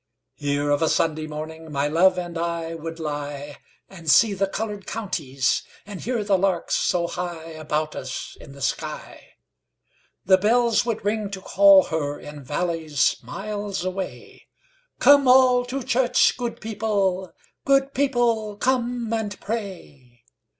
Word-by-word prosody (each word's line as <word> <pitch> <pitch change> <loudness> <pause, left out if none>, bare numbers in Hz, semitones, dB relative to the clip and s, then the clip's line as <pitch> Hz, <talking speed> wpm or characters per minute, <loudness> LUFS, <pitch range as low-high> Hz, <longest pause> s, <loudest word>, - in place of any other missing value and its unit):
Here 145 0 -1
of 145 - +2
a 160 - +3
Sunday 155 -1 0
morningMy 155 -1 -4
love 180 +2 +5
and 175 -1 -4
I 165 0 -3
would 165 0 -7
lie, 145 -2 -5 0.3
And 170 -5 -8
see 215 +6 +6
the 195 0 0
coloured 205 0 -5
counties, 140 - -1 0.2
And 205 -3 -8
hear 240 -2 -1
the 200 -2 +2
larks 185 -3 0
so 175 -2 +1
highAbout 160 -3 -4
us - - -6
in 140 - -12
the 140 -1 -8
sky. - - -5 0.9
The 190 0 +5
bells 235 +3 +2
would 220 -3 -2
ring 210 0 -1
to 195 -1 -6
call 195 0 +6
herIn 145 -1 -4
valleys 155 0 0
miles 205 -2 -5
away:'Come 285 - 0
all 250 -1 +6
to 260 +2 -4
church, 250 0 +3
good 240 -2 -4
people; 200 -4 -1 0.3
Good 275 0 +2
people, 235 -6 +1
come 245 -2 0
and 215 -3 -3
pray. 160 - -7
190 Hz, 130 wpm, -23 LUFS, 160-225 Hz, 0.9 s, see